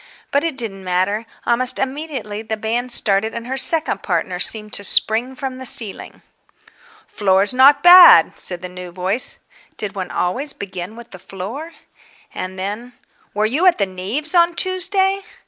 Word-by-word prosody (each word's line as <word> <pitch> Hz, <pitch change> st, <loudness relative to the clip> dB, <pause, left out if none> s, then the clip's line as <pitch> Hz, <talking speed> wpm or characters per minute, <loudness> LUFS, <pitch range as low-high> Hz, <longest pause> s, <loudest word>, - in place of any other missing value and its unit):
But 280 Hz, -, +1 dB
it 330 Hz, -5 st, -3 dB
didn't 200 Hz, -6 st, -5 dB
matter. 185 Hz, +5 st, -2 dB, 0.2 s
Almost 250 Hz, +1 st, +1 dB
immediately 265 Hz, -6 st, -5 dB
the 220 Hz, 0 st, -5 dB
band 235 Hz, +3 st, -3 dB
started 220 Hz, -1 st, 0 dB
and 235 Hz, 0 st, -6 dB
her 260 Hz, +2 st, -4 dB
second 320 Hz, +4 st, +2 dB
partner 180 Hz, 0 st, -3 dB
seemed 215 Hz, +2 st, +2 dB
to 200 Hz, -, -1 dB
spring 230 Hz, +6 st, +2 dB
from 260 Hz, -1 st, -6 dB
the 260 Hz, -, -9 dB
ceiling. 220 Hz, -5 st, +1 dB, 0.8 s
"Floor's 195 Hz, +1 st, +1 dB
not 270 Hz, +3 st, +5 dB
bad," 355 Hz, 0 st, +8 dB
said 180 Hz, -1 st, -1 dB
the -, -, -5 dB
new 180 Hz, 0 st, -10 dB
voice. 190 Hz, +9 st, -2 dB, 0.4 s
Did 210 Hz, -2 st, -5 dB
one 185 Hz, -2 st, -6 dB
always 265 Hz, +11 st, -2 dB
begin 190 Hz, +1 st, -8 dB
with 235 Hz, 0 st, -14 dB
the 185 Hz, -, -12 dB
floor? 225 Hz, -, -8 dB, 0.6 s
And 185 Hz, +1 st, -7 dB
then, 210 Hz, +6 st, -6 dB, 0.4 s
"Were 210 Hz, +1 st, 0 dB
you 295 Hz, +12 st, +1 dB
at 360 Hz, -, +4 dB
the 200 Hz, -, 0 dB
Neaves' 200 Hz, -, -5 dB
on 340 Hz, -1 st, +3 dB
Tuesday?" 380 Hz, +2 st, +1 dB
225 Hz, 165 wpm, -18 LUFS, 195-275 Hz, 0.8 s, bad